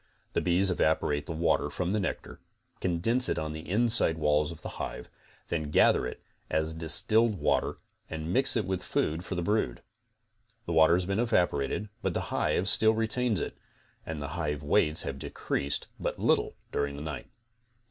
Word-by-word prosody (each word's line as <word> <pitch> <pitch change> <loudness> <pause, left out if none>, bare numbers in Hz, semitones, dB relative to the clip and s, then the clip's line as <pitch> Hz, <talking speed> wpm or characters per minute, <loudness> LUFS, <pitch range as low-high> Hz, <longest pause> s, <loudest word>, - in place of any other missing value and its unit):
The - - +1
bees 90 +2 +2
evaporate 75 -3 0
the - - -4
water 80 +1 +1
from 90 0 -2
the 105 - +1
nectar, 95 - -4 0.4
condense 115 +9 +1
it - - 0
on 80 0 -3
the 80 +1 -8
inside 110 -5 +2
walls 75 0 +1
of 80 -1 -11
the - - -4
hive, 60 - -6 0.4
then 80 -3 -2
gather 65 - +4
it - - -9 0.3
as 80 +1 0
distilled 105 +8 +4
water - - 0 0.3
and 80 +2 -4
mix 130 -1 +2
it 110 - 0
with 95 -1 -2
food 80 -1 -1
for 95 - -5
the 85 - -2
brood. 105 +4 -1 0.8
The 85 - -3
water 80 +1 +6
has 90 0 0
been 100 +3 -1
evaporated, 100 - 0
but 95 -3 -2
the - - -3
hive 75 +8 +1
still 110 +3 +5
retains 115 -1 +1
it, - - -4 0.5
and 80 -2 -5
the 70 -1 -5
hive 75 -2 -3
weights 75 +1 +3
have 70 0 -5
decreased 70 +1 -2
but - - -3
little - - +1 0.2
during 70 0 -2
the 70 - -7
night. 75 -3 -6
85 Hz, 180 wpm, -29 LUFS, 75-100 Hz, 0.8 s, water